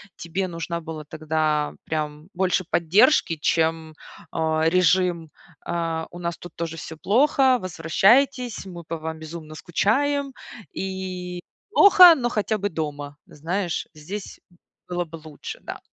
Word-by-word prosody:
тебе 185 +3 -3
нужна 170 0 -4
была 155 -2 -7
тогда 155 -1 -1
прям 150 0 -4
больше 185 0 +1
поддержки, 170 - +3
чем, 160 0 0 0.4
а, 160 -1 0
режим, 180 -2 +2 0.4
э, 165 -1 -2
"у 175 - -11
нас 170 -1 -3
тут 175 - -11
тоже 165 -1 -4
всё 160 0 -8
плохо, 260 - +3
возвращайтесь, 215 - +2
мы 175 -2 -9
по 165 +1 -5
вам 160 0 -6
безумно 160 -1 -9
скучаем" 275 - 0 0.4
и 185 -2 -5 0.3
"плохо, 365 -6 +9
но 240 -4 -1
хотя 215 0 -1
бы 205 +1 -2
дома". 145 -2 -5
Знаешь, 170 +4 -3
здесь 185 +7 -8 0.5
было 175 -1 -2
бы 165 +1 -10
лучше, 155 -2 -9
да. - - -7
170 Hz, 130 wpm, -24 LUFS, 160-195 Hz, 0.5 s, плохо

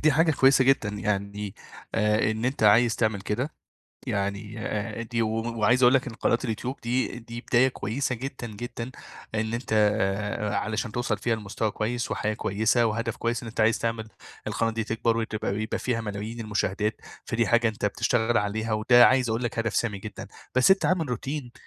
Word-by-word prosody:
دي 155 -1 +4
حاجة 160 +3 +4
كويسة 135 -1 +5
جدًا 135 -5 +3
يعني 100 -1 -3 0.4
آآ 105 0 +2
إن 110 +1 -3
أنت 130 -2 -1
عايز 115 +2 +5
تعمل 110 -3 0
كده 120 +10 -3 0.5
يعني 100 +2 -2
آآ 105 +1 -3
دي 115 0 -2
و 110 - +1 0.3
وعايز 125 +3 +4
أقول 125 +2 +7
لك 135 +1 +2
إن 120 - -5
قناة 115 +1 +1
الYouTube 125 +3 -3
دي 125 0 -1
دي 115 0 -8
بداية 130 0 +3
كويسة 125 +1 -2
جدًا، 130 0 -6
جدًا 115 +3 -6 0.4
إن 110 +1 -1
أنت 120 -1 -3 0.8
علشان 110 +1 -2
توصل 120 -2 -1
فيها 115 +3 0
لمستوى 105 0 -3
كويس 120 +3 -2
وحياة 110 0 -1
كويسة 110 +4 +1
وهدف 115 +1 -1
كويس 115 0 -1
إن - - -7
أنت 110 - -2
عايز 110 +1 +3
تعمل 115 -1 -2 0.4
القناة 115 - 0
دي 115 0 -2
تكبر 115 +1 0
وتبقى 110 -3 -2
يبقى 110 - -2
فيها 120 -2 -1
ملايين 105 +2 -5
المشاهدات 105 0 -1 0.2
فدي 115 -1 0
حاجة 120 +1 +4
أنت 110 -1 -2
بتشتغل 115 +3 +1
عليها 110 +2 -1
وده 120 +3 +6
عايز 130 -2 +2
أقول 115 +2 -1
لك 115 -1 -2
هدف 115 -1 -1
سامي 105 -4 0
جدًا، 105 +2 -8 0.3
بس 130 +9 +6
أنت 190 - +3
عامل 165 -6 +1
روتين 130 +1 -4
115 Hz, 185 wpm, -26 LUFS, 105-120 Hz, 0.8 s, أقول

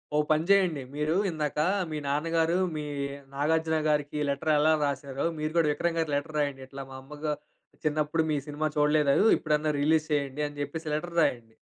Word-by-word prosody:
ఓ - - +3
పని 155 +1 +3
జెయండి. 180 -8 +4
మీరు 150 +3 0
ఇందాక 150 -2 -2 0.3
మీ 155 - -2
నాన్నగారు 165 +4 +1 0.2
మీ 150 - -3 0.5
'నాగార్జున' 160 +2 +1
గారికి 150 0 0
లెటర్ 140 +3 0
ఎలా 155 +1 +4
రాసారో 140 0 -3
మీరు 155 0 -2
గూడా 165 -2 +4
'విక్రమ్' 170 +3 -1
గారికి 160 -3 0
లెటర్ 150 +2 -3
రాయండి. 140 -2 -1
ఇట్లా 135 0 -7
మా - - -8
అమ్మ 145 +3 -11
గా 150 - +1 0.5
చిన్నప్పుడు 155 +1 +1
మీ 150 - +1
సినిమా 150 +1 -1
చూడలేదు. 150 +3 +4
ఇప్పుడన్నా 155 -1 0
రిలీజ్ 155 +1 +2
చేయండి 145 0 -1
అని 145 - -11
జెప్పేసి 155 +2 -4
లెటర్ 170 +2 -4
రాయండి. 115 -5 0
150 Hz, 175 wpm, -28 LUFS, 145-160 Hz, 0.5 s, జెయండి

